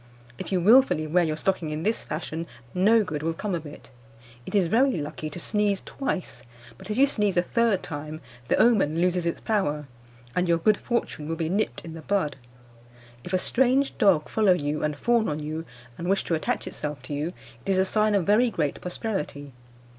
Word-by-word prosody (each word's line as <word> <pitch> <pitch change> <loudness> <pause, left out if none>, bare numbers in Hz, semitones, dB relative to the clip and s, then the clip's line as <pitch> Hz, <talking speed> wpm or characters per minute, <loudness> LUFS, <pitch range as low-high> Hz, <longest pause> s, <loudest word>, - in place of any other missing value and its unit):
If - - -6
you 185 - +2
wilfully 195 -6 +5
wear 175 +3 +3
your 155 -2 -1
stocking 180 -3 -1
in 155 +1 -4
this 220 +4 0
fashion, 160 +1 -5 0.3
no 215 +5 +4
good 155 -6 -4
will 165 +1 -1
come 205 +2 -3
of 165 -3 -3
it. 145 - -13 0.6
It - - -4
is 195 -3 +4
very 235 +5 +3
lucky 155 +1 -5
to 165 - -8
sneeze 205 +1 +1
twice; 230 -9 -4 0.4
but 190 - -11
if 210 - -2
you 275 - +7
sneeze 210 -9 0
a 175 - +4
third 225 -1 +1
time, 155 0 -6 0.3
the - - +3
omen 200 -9 +3
loses 180 -1 +1
its 170 - -2
power, 150 -9 -1 0.5
and 180 -1 +1
your 170 - +4
good 205 +5 +3
fortune 235 -10 -3
will 165 - -1
be 160 -1 -2
nipped 200 -1 -1
in 165 - -7
the 165 - -8
bud. 155 -4 0 0.9
If - - -8
a 185 - +3
strange 265 +7 +2
dog 175 -7 +4
follow 210 -4 +3
you, 150 -3 -2
and 150 -1 -1
fawn 235 +4 +2
on 150 - -2
you, 155 +2 -4 0.3
and 175 +2 -3
wish 195 0 +2
to - - -2
attach 160 - -1
itself 150 -1 -5
to 150 - -6
you, 150 +4 -2 0.3
it - - -6
is 190 - +3
a 190 - +3
sign 215 +1 +2
of 190 -4 +1
very 220 +5 +4
great 155 -9 -2
prosperity. 150 - -4
180 Hz, 205 wpm, -26 LUFS, 155-210 Hz, 0.9 s, you